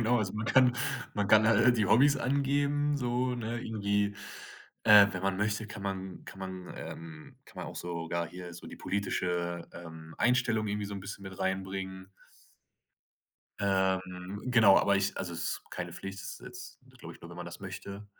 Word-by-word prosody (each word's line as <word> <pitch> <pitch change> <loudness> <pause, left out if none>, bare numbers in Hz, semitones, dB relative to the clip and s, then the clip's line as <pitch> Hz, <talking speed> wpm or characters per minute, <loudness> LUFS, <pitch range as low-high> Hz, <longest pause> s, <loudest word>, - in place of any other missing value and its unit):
genau, 120 +2 +3
also 100 -3 -1
man 110 +1 -3
kann 125 0 +5 0.4
man 105 -2 0
kann 110 0 +6
halt 120 +2 +5
die 105 -3 +2
Hobbys 140 +7 +5
angeben, 140 +2 +1
so, 125 0 0
ne, 120 0 -3
irgendwie 100 -2 0 0.7
äh, 105 -2 +9
wenn 90 0 -4
man 95 -1 +1
möchte, 105 +1 0
kann 105 -2 -8
man 95 -1 -5
kann 95 - -11
man, 95 -1 -6
ähm 80 -2 -9
kann - - -19
man - - -5
auch - - -8
sogar 85 -1 -3
hier 90 0 -8
so 85 - -10
die - - -9
politische, 90 -3 -2
ähm, 80 -2 -10
Einstellung 120 -3 +2
irgendwie 105 0 -2
so 100 - -6
'n 100 - -5
bisschen 100 0 -7
mit 95 -1 -8
reinbringen. 95 0 -3 1.5
Ähm, 95 0 0
genau, 115 -6 +7
aber 100 0 +3
ich 100 0 0
also - - -3
es - - -4
ist - - -28
keine - - -5
Pflicht, 95 0 -7
das - - -6
ist - - -13
jetzt, - - -10 0.2
glaube - - -9
ich, - - -17
nur, 85 - -10
wenn 85 - -10
man 90 0 -6
das 85 - -9
möchte. 100 +2 -7
100 Hz, 190 wpm, -31 LUFS, 95-110 Hz, 1.5 s, äh